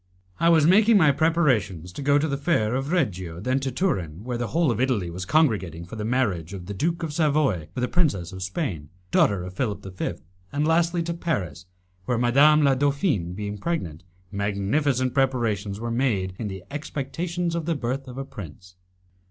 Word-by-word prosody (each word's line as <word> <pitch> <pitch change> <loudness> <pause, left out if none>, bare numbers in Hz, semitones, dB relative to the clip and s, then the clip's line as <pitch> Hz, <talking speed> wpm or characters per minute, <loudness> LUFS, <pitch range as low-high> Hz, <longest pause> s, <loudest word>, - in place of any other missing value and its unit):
I 170 - +4
was 160 -3 +5
making 210 +6 +6
my 155 -6 +6
preparations 130 - +1
to - - -6
go 140 +1 +4
to 150 +2 +1
the 140 - -1
Fair 140 -7 +1
of 135 +4 -2
Reggio, 95 - -1
then 130 +7 0
to 135 0 -3
Turin, 100 - -1
where 120 0 -3
the 120 - -1
whole 165 -2 +2
of 115 +1 -1
Italy 110 -10 0
was 90 +2 -5
congregating 95 - +1
for 90 - -9
the 105 - -4
marriage 100 -7 -1
of 90 -2 -8
the 100 - -5
Duke 165 - -1
of 155 -2 -3
Savoy 145 - +1
with 125 - -2
a - - +2
princess 120 - 0
of 95 -1 -8
Spain, 95 - -3 0.2
daughter 100 -3 +3
of 90 0 -7
Philip 105 -2 -3
V., - - -2 0.4
and 145 +2 0
lastly 170 +1 +2
to 170 +1 -2
Paris, 95 - -3 0.4
where, 125 - 0
Madame 140 +6 +5
la 140 -1 +5
Dauphine 140 - 0
being 105 +1 -5
pregnant, 100 - -3 0.3
magnificent 115 +7 0
preparations 115 -7 0
were 115 +1 -3
made 110 -7 0
in 110 - -3
the 95 -2 -7
expectation 165 +4 -3
of 170 -2 -2
the 165 - +1
birth 130 +1 -3
of 125 0 -9
a 135 - -4
prince. 90 - -11
125 Hz, 195 wpm, -25 LUFS, 95-150 Hz, 0.4 s, making